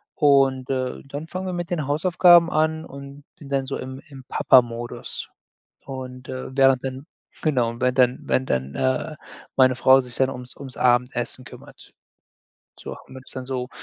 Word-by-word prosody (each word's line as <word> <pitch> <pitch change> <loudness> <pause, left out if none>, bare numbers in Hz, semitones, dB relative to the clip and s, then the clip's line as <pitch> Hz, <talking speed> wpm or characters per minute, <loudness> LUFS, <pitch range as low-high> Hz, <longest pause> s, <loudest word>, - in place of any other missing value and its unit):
Und, 135 -3 +3
äh, 130 -1 -2
dann 145 +3 -7
fangen 185 +2 -5
wir 180 - -3
mit 175 -1 -4
den 155 -5 -2
Hausaufgaben 175 +2 +5
an 160 +1 0
und 140 0 -11 0.2
bin 140 -2 -11
dann 135 -1 0
so 135 - -4
im 130 +1 -7
im 135 -2 -12
Papa 130 -1 +5
Modus. 120 0 -7 0.6
Und, 130 -1 -8
äh, 130 0 -6
während 135 -1 +4
dann 130 +2 -5 0.4
genau, 125 -7 +1
während 125 +1 +1
dann 125 0 +4
während 130 - 0
dann, 65 +1 -1
äh, 130 +4 -1 0.4
meine 130 -1 +5
Frau 130 +1 +5
sich 125 -1 -9
dann 130 0 +2
ums 125 -1 -8
ums 135 -2 -9
Abendessen 120 0 +1
kümmert. - - -14 0.9
So, - - -7
und - - -9
dann - - -13
bin 130 - -10
ich - - -9
dann 130 -1 -6
so, 130 -1 -3
130 Hz, 180 wpm, -23 LUFS, 125-140 Hz, 0.9 s, Hausaufgaben